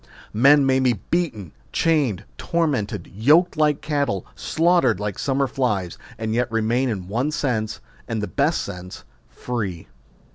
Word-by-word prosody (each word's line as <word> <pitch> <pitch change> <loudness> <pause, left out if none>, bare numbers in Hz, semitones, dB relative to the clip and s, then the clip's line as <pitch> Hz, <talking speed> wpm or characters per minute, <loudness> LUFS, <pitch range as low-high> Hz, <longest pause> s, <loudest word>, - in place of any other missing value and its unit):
Men 140 +6 +6
may 130 0 +3
be 130 -2 +3
beaten, 110 - -3 0.2
chained, 145 - +1
tormented, 150 - -1
yoked 150 - +4
like 150 -2 +2
cattle, 140 - -1
slaughtered 165 - +2
like 105 -2 -4
summer 140 0 +1
flies, 105 -10 -2 0.2
and 110 0 -2
yet 125 0 0
remain 115 +3 +1
in 95 -6 -4
one 120 +9 -1
sense, 115 -8 -2 0.3
and 115 -1 -2
the 105 - -1
best 140 - +1
sense, 90 -2 -8 0.3
free. 100 -9 -4
125 Hz, 140 wpm, -22 LUFS, 105-145 Hz, 0.3 s, Men